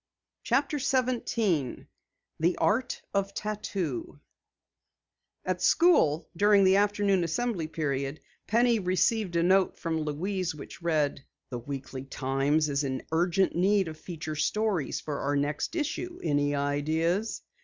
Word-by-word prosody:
CHAPTER 280 +4 +1
17 230 - 0 0.5
THE 170 +3 +2
ART 245 +4 0
OF 200 0 -1
TATTOO 210 - -4 1.3
At - - -1
school, 250 - +4
during 205 +2 +5
the 190 +1 +5
afternoon 205 -2 +2
assembly 170 0 -1
period, 140 -2 -2 0.3
Penny 235 +1 +3
received 185 +1 +1
a 170 - +3
note 190 +1 +3
from 160 -1 -2
Louise 175 +4 -2
which 150 - -10
read: 155 -5 0 0.3
"The 125 - -3
Weekly 135 +1 -6
Times 135 +3 0
is 140 0 0
in 130 -1 -3
urgent 175 +3 +2
need 190 0 +2
of 155 - -7
feature 155 -2 -6
stories 200 0 0
for 150 -2 -4
our 145 +1 0
next 145 - -1
issue. 345 +2 -3
Any 145 -2 +1
ideas?" 160 +8 0
175 Hz, 125 wpm, -28 LUFS, 145-210 Hz, 1.3 s, during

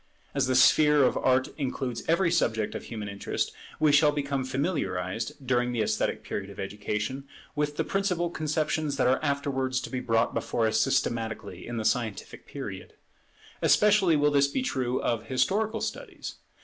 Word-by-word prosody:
As 140 -2 +1
the 130 - +1
sphere 150 +2 +6
of - - +3
Art 130 0 +2
includes 130 -3 -2
every 170 +1 +3
subject 110 -11 +1
of - - -6
human 110 -3 -6
interest, 100 0 -3 0.3
we 155 -1 +4
shall 150 +1 +5
become 140 -2 -2
familiarized, 130 - -2
during 125 -1 +1
the 115 -3 +1
esthetic - - -1
period 100 0 -5
of 100 - -11
education, 105 +6 -3 0.3
with 150 0 -1
the 160 - +1
principal 180 -1 0
conceptions 155 -2 -1
that 130 - +2
are 130 +1 +3
afterwards 140 -3 0
to - - -7
be 130 - -2
brought 115 -2 +1
before 115 - 0
us 110 0 +2
systematically 110 -1 -1
in 120 0 -4
the 110 - -3
scientific 110 -4 -2
period. - - -7 0.7
Especially 205 -5 +4
will 150 0 +3
this 140 -1 +4
be 255 - -2
true 130 - -1
of 115 -2 -1
historical 215 - 0
studies. - - -5
130 Hz, 165 wpm, -27 LUFS, 115-150 Hz, 0.7 s, sphere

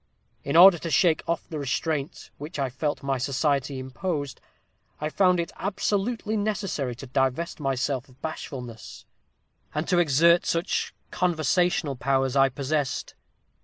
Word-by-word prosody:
In 140 - -2
order 175 0 +9
to 165 - -4
shake 165 -1 +3
off 170 - -1
the 155 - -5
restraint 145 +2 -3
which 150 +4 -7
I 135 -3 -1
felt 145 +3 -2
my 135 -1 -1
society 140 +1 0
imposed, 145 +2 -4 0.6
I 150 - -2
found 180 +1 +3
it 170 - -2
absolutely 210 +3 -1
necessary 195 - -2
to 130 - -9
divest 135 +6 -1
myself 135 -1 -1
of 130 - -21
bashfulness, 125 -7 -7 0.7
and 155 +2 -1
to 180 -2 +3
exert 170 +2 +4
such 170 +3 -1 0.2
conversational 175 -3 +1
powers 135 +1 +1
as - - -6
I 135 0 +5
possessed. 140 +1 -2
150 Hz, 140 wpm, -26 LUFS, 135-175 Hz, 0.7 s, order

